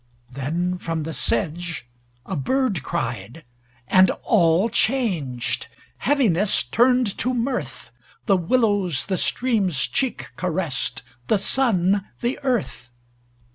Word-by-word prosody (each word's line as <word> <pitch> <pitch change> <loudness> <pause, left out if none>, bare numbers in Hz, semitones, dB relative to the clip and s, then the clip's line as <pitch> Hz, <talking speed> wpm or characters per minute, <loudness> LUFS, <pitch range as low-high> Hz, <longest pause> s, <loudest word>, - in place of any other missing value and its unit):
Then 170 +8 -2
from 165 -2 -3
the 160 +1 -5
sedge 155 +3 -1 0.4
a 190 - -4
bird 205 - 0
cried; 120 +5 -4 0.4
and 185 -1 +5
all 175 -1 +3
changed. 155 - -1 0.3
Heaviness 215 - +2
turned 245 -2 +2
to 255 +1 0
mirth: 245 +2 -3 0.3
The 200 - +4
willows 195 - +1
the 190 -2 -1
stream's 200 - +1
cheek 265 -3 -2
caressed, 160 -8 -2 0.2
The 215 - +3
sun 200 -3 +2 0.2
the 245 +2 -1
earth. 245 - -2
185 Hz, 105 wpm, -23 LUFS, 160-235 Hz, 0.4 s, and